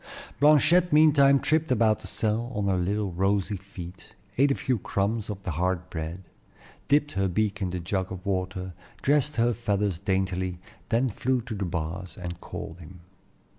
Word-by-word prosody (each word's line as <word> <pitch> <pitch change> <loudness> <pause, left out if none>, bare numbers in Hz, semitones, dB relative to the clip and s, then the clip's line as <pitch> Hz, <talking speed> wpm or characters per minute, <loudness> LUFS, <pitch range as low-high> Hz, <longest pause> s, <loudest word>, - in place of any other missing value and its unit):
Blanchette 155 +4 +5
meantime 145 -3 +6
tripped 155 0 +1
about 110 -3 +3
the 105 - -9
cell 110 +5 -1
on 105 - -1
her 95 -1 +2
little 100 +2 -1
rosy 95 +3 0
feet, 95 -2 -11 0.2
ate 140 +3 +4
a 140 - +2
few 125 -4 -1
crumbs 105 +3 -1
of 100 -2 -6
the 95 - -3
hard 90 +2 -1
bread, 80 +3 -5 0.6
dipped 145 +1 +3
her 95 0 0
beak 100 +2 -1
in 95 - 0
the 90 0 -3
jug 95 +2 -2
of 95 0 -7
water, 95 -1 -2 0.3
dressed 145 +1 +2
her 120 +1 +2
feathers 105 -6 -1
daintily, 95 -2 -1 0.3
then 120 +3 +2
flew 125 +3 0
to 120 -1 -6
the 100 -2 -2
bars 85 +2 -4
and 90 -1 -6
called 80 - -7
him. 90 +1 -12
100 Hz, 170 wpm, -27 LUFS, 90-120 Hz, 0.6 s, meantime